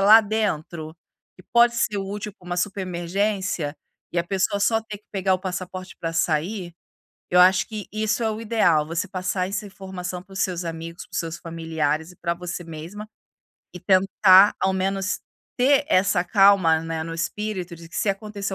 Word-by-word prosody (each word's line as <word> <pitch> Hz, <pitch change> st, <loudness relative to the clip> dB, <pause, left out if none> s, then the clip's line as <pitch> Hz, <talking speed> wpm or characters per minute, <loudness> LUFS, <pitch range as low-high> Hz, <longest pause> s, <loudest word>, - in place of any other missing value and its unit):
lá 215 Hz, +3 st, +9 dB
dentro, 170 Hz, -7 st, -2 dB, 0.4 s
que 185 Hz, -, -15 dB
pode 235 Hz, 0 st, +5 dB
ser 210 Hz, -3 st, 0 dB
útil 205 Hz, +1 st, -5 dB
para 180 Hz, -, -17 dB
uma 175 Hz, 0 st, -3 dB
super 200 Hz, +2 st, -1 dB
emergência, 185 Hz, -3 st, -2 dB, 0.4 s
e 175 Hz, -, 0 dB
a 170 Hz, -, +1 dB
pessoa 195 Hz, +2 st, 0 dB
só 225 Hz, +2 st, +3 dB
ter 215 Hz, -2 st, -8 dB
que 210 Hz, -, -37 dB
pegar 190 Hz, -1 st, +2 dB
o -, -, -1 dB
passaporte 185 Hz, 0 st, -6 dB
para 165 Hz, 0 st, -2 dB
sair, 175 Hz, +3 st, -1 dB, 0.6 s
eu 180 Hz, -, +4 dB
acho 185 Hz, +3 st, +6 dB
que 215 Hz, -3 st, -6 dB
isso 215 Hz, +2 st, 0 dB
é 220 Hz, -, +1 dB
o 215 Hz, -, -5 dB
ideal, 210 Hz, -9 st, +3 dB
você 170 Hz, +4 st, -2 dB
passar 185 Hz, 0 st, -2 dB
essa 205 Hz, +1 st, -3 dB
informação 185 Hz, -2 st, -7 dB
para 195 Hz, -, -16 dB
os 190 Hz, -, -5 dB
seus 180 Hz, -2 st, -1 dB
amigos, 165 Hz, +1 st, -6 dB
para -, -, -28 dB
os -, -, 0 dB
seus 165 Hz, 0 st, -4 dB
familiares 160 Hz, -1 st, -2 dB
e 180 Hz, -, -18 dB
para 170 Hz, -1 st, -1 dB
você 175 Hz, 0 st, -6 dB
mesma, 170 Hz, +7 st, -8 dB, 0.7 s
e -, -, -6 dB
tentar 190 Hz, +1 st, +6 dB
ao 190 Hz, -, +2 dB
menos 195 Hz, +1 st, -1 dB, 0.4 s
ter 275 Hz, +3 st, +4 dB
essa 185 Hz, -1 st, +3 dB
calma, 195 Hz, -5 st, +5 dB
né, 165 Hz, 0 st, -3 dB
no 165 Hz, -, -5 dB
espírito 185 Hz, 0 st, -3 dB
de 165 Hz, 0 st, -12 dB
que -, -, -9 dB
se -, -, 0 dB
acontecer 200 Hz, -1 st, -3 dB
185 Hz, 190 wpm, -24 LUFS, 170-205 Hz, 0.7 s, lá